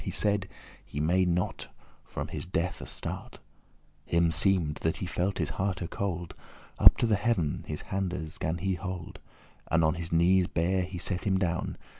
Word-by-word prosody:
He - - -3
said, 100 -2 +1 0.3
he 75 - -6
may 90 +5 +3
not 90 0 -1 0.4
from - - -5
his - - -4
death 90 0 -1
astart.* - - -5
*escape - - -17 0.6
Him 85 0 +3
seemed, 80 -2 +3
that 80 - -1
he - - -3
felt 90 +2 -1
his 80 -5 -1
hearte 95 -2 -2
cold. 90 -4 -3 0.5
Up - - +9
to - - +2
the 110 -3 +3
heav'n 95 -9 0
his 75 -1 -4
handes 90 -5 -3
gan 80 +2 -1
he 95 +2 0
hold, 90 -2 -5 0.5
And 80 +1 +3
on 80 - +4
his 85 -1 -5
knees 90 +2 +4
bare 90 +3 +1
he 90 +1 -4
set 90 +1 -2
him 95 -2 +3
down. 90 -2 -1
90 Hz, 180 wpm, -29 LUFS, 85-95 Hz, 0.6 s, Up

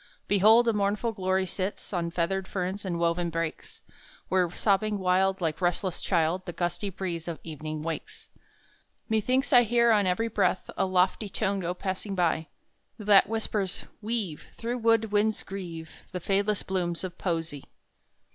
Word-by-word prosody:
Behold, 220 +4 +6
a 230 - +4
mournful 210 +3 0
glory 190 -2 0
sits 190 +3 -4
On 170 -2 0
feathered 185 +3 -1
ferns 190 +2 -3
and 175 -2 -2
woven 170 +1 +1
brakes, 165 -1 -4 0.5
Where 185 -1 +2
sobbing 205 +3 +1
wild 190 +1 +2
like 160 -1 -1
restless 175 +1 0
child 175 +1 +1
The 175 - -4
gusty 175 +4 -2
breeze 175 -3 -4
of 170 -2 -3
evening 155 -1 -5
wakes! 165 -1 -5 0.8
Methinks 255 +6 +1
I 245 - +9
hear 235 0 +3
on 205 -3 +4
every 205 +6 +1
breath 200 -4 0
A - - +1
lofty 185 +3 +2
tone 195 +1 0
go 175 -1 -2
passing 190 +2 -3
by, 165 -3 +1 0.5
That 205 -2 +5
whispers 215 -4 -1 0.2
"Weave, 210 -8 -3 0.2
Though 235 +1 -2
wood 225 -2 +2
winds 210 +1 +1
grieve, 170 -5 -7 0.2
The 180 - -2
fadeless 200 +3 0
blooms 175 -2 -2
of 185 -1 -6
Poesy!" 165 -5 -2
190 Hz, 155 wpm, -28 LUFS, 175-210 Hz, 0.8 s, I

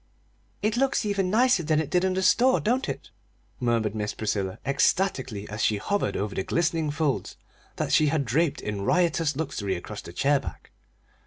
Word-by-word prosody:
"It 215 +2 +1
looks 270 -3 +1
even 200 -3 0
nicer 235 -1 +4
than 155 -1 +1
it 155 - -3
did 180 0 +2
in 190 0 +1
the 190 - 0
store, 255 +7 +4
don't 250 +5 0
it?" - - -6 0.5
murmured 115 -4 +1
Miss 105 -1 -3
Priscilla, 100 -3 -2
ecstatically, 135 - 0
as 105 +1 -5
she 105 - +2
hovered 200 - -1
over 100 0 -2
the - - -1
glistening 165 - 0
folds 145 -2 -1 0.4
that - - -2
she 155 - +5
had 145 -1 +1
draped 150 +6 +1
in 105 -2 -4
riotous 165 - +1
luxury 130 -11 -2
across 85 - -7
the - - -10
chair 140 +10 +2
back. - - -9
150 Hz, 180 wpm, -26 LUFS, -, 0.5 s, she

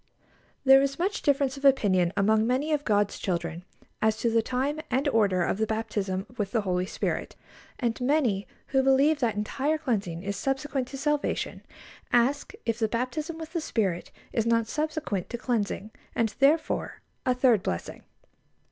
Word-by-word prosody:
There 270 0 +8
is 275 0 -1
much 380 +4 -1
difference 280 -1 +1
of 275 - -10
opinion 195 -10 +4
among 215 +2 +3
many 265 +5 0
of 295 -1 +1
God's 205 -4 +1
children 170 -2 -2 0.4
as 220 0 +2
to 235 - 0
the 230 0 +4
time 265 +6 -1
and 270 +4 +1
order 200 -8 +3
of 190 - -1
the 220 - +1
baptism 205 -3 -2
with 200 -2 0
the 225 - +2
Holy 180 -2 -1
Spirit, - - -3 0.4
and 235 0 -1
many 250 -7 +1 0.2
who 270 -1 +3
believe 275 +3 +4
that 235 -5 +1
entire 270 +9 0
cleansing 205 - -2
is 200 +1 -3
subsequent 270 +3 -2
to 275 - -7
salvation, 295 +1 -1 0.5
ask 250 +4 +2
if 230 0 -1
the 220 - +2
baptism 255 +9 -3
with 320 0 -8
the 335 - -1
Spirit 195 - -1 0.2
is 225 -1 +1
not 230 -1 +3
subsequent 300 - -2
to 240 - -4
cleansing, 220 -3 -2 0.2
and, 225 -2 +1
therefore, 295 +4 +2 0.2
a 255 - +2
third 245 -5 +4
blessing. 85 - -4
240 Hz, 165 wpm, -27 LUFS, 205-275 Hz, 0.5 s, There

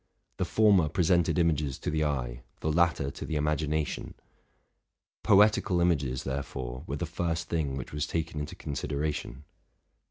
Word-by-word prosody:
The - - 0
former 100 -8 +4
presented 85 +1 +2
images 75 -5 +1
to - - -3
the 75 0 +1
eye, - - -2 0.2
the 80 - 0
latter 80 -4 +2
to - - -8
the 80 - -3
imagination: 75 0 -1 1.1
poetical 105 -3 +4
images, 70 -8 +1
therefore, 65 -2 -4
were 70 - -2
the 85 - -2
first 85 0 -2
thing 75 -5 -1
which 65 - -7
was 75 0 -1
taken 80 -2 -2
into 75 0 -5
consideration. 70 -2 -3
75 Hz, 145 wpm, -29 LUFS, 70-85 Hz, 1.1 s, former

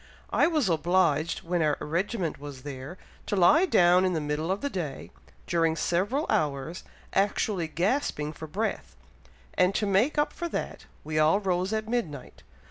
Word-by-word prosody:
I - - +4
was 310 - +1
obliged, 170 -1 +1
when 175 0 -1
our 150 -2 +2
regiment 175 +1 -2
was 140 -3 -9
there, 140 +4 -7 0.3
to - - 0
lie 300 - +5
down 180 - +5
in 185 -1 +1
the 160 - 0
middle 150 +2 -2
of 195 - -2
the 285 - -1
day, 165 -7 -5 0.3
during 165 -2 +1
several 205 - 0
hours, 150 +3 -1 0.3
actually 195 -3 +1
gasping 170 - -1
for 160 - -8
breath; 190 - -3 0.6
and 180 +2 +2
to 210 - +1
make 205 +10 +2
up 295 - +1
for 345 - -4
that, - - -5 0.2
we 155 0 -1
all 155 +6 +4
rose 185 -1 -1
at 220 0 -2
midnight. 170 - -4
175 Hz, 165 wpm, -27 LUFS, 155-205 Hz, 0.6 s, lie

